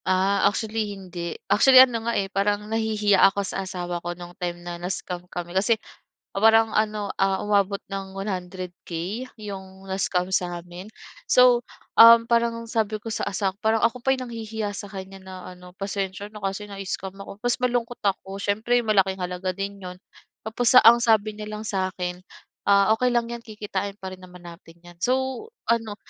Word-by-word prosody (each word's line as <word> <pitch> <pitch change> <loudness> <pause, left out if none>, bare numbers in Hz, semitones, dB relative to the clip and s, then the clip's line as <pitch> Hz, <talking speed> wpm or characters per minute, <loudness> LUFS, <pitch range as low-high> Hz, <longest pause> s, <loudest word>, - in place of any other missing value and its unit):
Ah, 190 +2 +3
actually 215 -1 -3
hindi. 175 -3 -6
Actually, 260 +5 +6
ano 235 -3 -4
nga, - - 0
eh, 195 - +1
parang 205 +2 0
nahihiya 215 -2 +1
ako 200 0 -3
sa 195 - -3
asawa 175 -2 -4
ko 175 0 -5
no'ng 175 0 -10
time 175 -1 -2
na 175 0 -6
na-scam 180 0 -5
kami 175 -1 -6
kasi, 210 +4 +2 0.6
parang 225 +2 +4
ano, 215 -1 0
ah, 195 0 +3
umabot 200 -1 +2
ng 195 -1 -5
100K 185 +1 -5
'yong 190 -2 -9
na-scam 185 -1 -1
sa'min. 175 +2 -3 0.4
So, 250 -1 +6 0.4
um, 230 0 +9
parang 235 0 +1
sabi 220 -2 0
ko 225 - -6
sa - - -2
asa 195 -1 -1
parang 220 0 +2
ako 235 +2 0
pa 265 - -1
'yong 260 -1 -4
nanghihiya 220 -2 -4
sa 205 0 -7
kanya 195 0 -8
na 190 0 -11 0.2
ano, 180 0 -14
"Pasensya 195 0 -4
na 210 - -10
kasi 195 +2 -3
na-scam 195 -1 -5
ako", 195 - -9
'pos 245 0 +1
malungkot 240 -1 -1
ako, 195 0 -1
siyempre 220 +5 +1
malaking 195 -3 +2
halaga 180 +1 -2
din 200 +1 -4
'yon. 180 -1 -8 0.5
Tapos 235 +3 +1
ang 230 +2 +8
sabi 215 -2 +3
niya 210 - -6
lang 210 0 -5
sa'kin, 185 -2 -3 0.5
ah, 200 +1 +5
"Okey 250 +2 +1
lang 235 -1 +1
'yan, 235 0 -6
kikitain 205 -2 -4
pa 190 0 -6
rin 185 - -21
naman 180 -1 -14
natin 170 -1 -13
'yan". 175 0 -15
So, 260 - 0 0.2
ano, 225 -2 0
200 Hz, 170 wpm, -24 LUFS, 185-220 Hz, 0.6 s, um